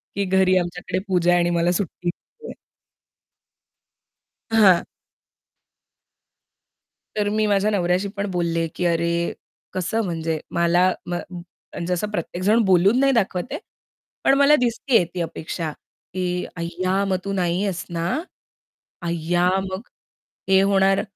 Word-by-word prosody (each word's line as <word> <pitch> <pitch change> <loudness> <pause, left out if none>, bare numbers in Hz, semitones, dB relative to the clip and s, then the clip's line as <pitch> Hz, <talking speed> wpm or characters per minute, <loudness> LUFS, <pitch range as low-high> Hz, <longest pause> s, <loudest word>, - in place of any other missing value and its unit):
की 200 - 0
घरी 185 0 +3
आमच्याकडे 180 +1 -2
पूजा 175 -2 +2
आहे 175 - +4
आणि 175 0 +2
मला 170 0 +2
सुट्टी 180 -1 -3
हवी 460 - -11
आहे. - - -7 2.0
हां. 195 -6 +6 2.3
तर 205 -1 +1
मी 215 0 +1
माझ्या 205 +1 +2
नवऱ्याशी 180 0 +1
पण 200 0 -2
बोलले, 170 -2 0
की 180 - -2
अरे 170 0 +1 0.6
कसं! 190 +5 -1
म्हणजे 165 -2 -2
मला 175 +1 +3
म 175 - -4 0.2
म्हणजे 175 0 -6
असं 205 +4 -2
प्रत्येकजण 185 +4 0
बोलून 190 +6 +4
नाही 275 0 +4
दाखवत 190 -5 +1
आहे. - - -3 0.6
पण - - +5
मला 285 +2 +6
दिसतीये 240 -3 +2
ती 180 - -3
अपेक्षा 160 0 -4 0.4
की 180 -1 -2
"अय्या 185 +3 -1
मग 190 -1 0
तू 200 - -2
नाही 180 0 0
आहेस 190 -3 -2
ना. 170 0 -2 1.0
अय्या 170 +2 +1
मग 190 0 -5 0.7
हे 190 0 +5
होणार 195 0 +3
180 Hz, 130 wpm, -22 LUFS, 175-200 Hz, 2.3 s, हां